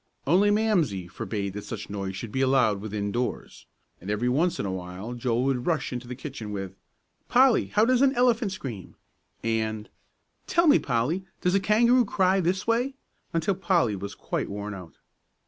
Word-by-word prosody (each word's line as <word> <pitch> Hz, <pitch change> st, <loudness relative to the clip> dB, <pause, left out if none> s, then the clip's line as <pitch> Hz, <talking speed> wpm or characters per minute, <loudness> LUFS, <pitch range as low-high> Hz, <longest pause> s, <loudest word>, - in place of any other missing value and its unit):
Only 185 Hz, +8 st, +4 dB
Mamsie 180 Hz, -, +1 dB
forbade 100 Hz, +1 st, -4 dB
that 105 Hz, 0 st, -6 dB
such 110 Hz, -3 st, -6 dB
noise 95 Hz, -1 st, -4 dB
should 105 Hz, +2 st, -6 dB
be 130 Hz, -, -1 dB
allowed 130 Hz, -7 st, +3 dB
within 100 Hz, -1 st, -3 dB
doors. 120 Hz, +3 st, -4 dB, 0.3 s
And 95 Hz, -, -8 dB
every 105 Hz, +4 st, 0 dB
once 160 Hz, +7 st, +1 dB
in -, -, -1 dB
a 95 Hz, -, -2 dB
while 95 Hz, +5 st, -6 dB
Joel 120 Hz, 0 st, 0 dB
would 130 Hz, -2 st, -1 dB
rush 160 Hz, -6 st, 0 dB
into 125 Hz, 0 st, -5 dB
the 125 Hz, -, -5 dB
kitchen, 130 Hz, -5 st, -7 dB
with 95 Hz, -2 st, -5 dB, 0.6 s
"Polly, 255 Hz, -1 st, +5 dB
how 210 Hz, +1 st, +3 dB
does 255 Hz, +1 st, +3 dB
an 275 Hz, 0 st, +4 dB
elephant 240 Hz, -4 st, +2 dB
scream?" 120 Hz, -, -7 dB, 0.5 s
and 110 Hz, -1 st, -1 dB, 0.6 s
"Tell 340 Hz, -, +3 dB
me, 300 Hz, -2 st, +6 dB
Polly, 140 Hz, +10 st, -1 dB, 0.2 s
does 180 Hz, -, +1 dB
a 195 Hz, -, +4 dB
kangaroo 235 Hz, +5 st, +4 dB
cry 190 Hz, -1 st, +2 dB
this 185 Hz, +1 st, 0 dB
way?" 245 Hz, +4 st, +1 dB, 0.4 s
until 165 Hz, +4 st, +1 dB
Polly 175 Hz, -, +1 dB
was 100 Hz, +1 st, -6 dB
quite -, -, -3 dB
worn 105 Hz, +1 st, -5 dB
out. 90 Hz, -4 st, -10 dB
130 Hz, 180 wpm, -26 LUFS, -, 0.6 s, me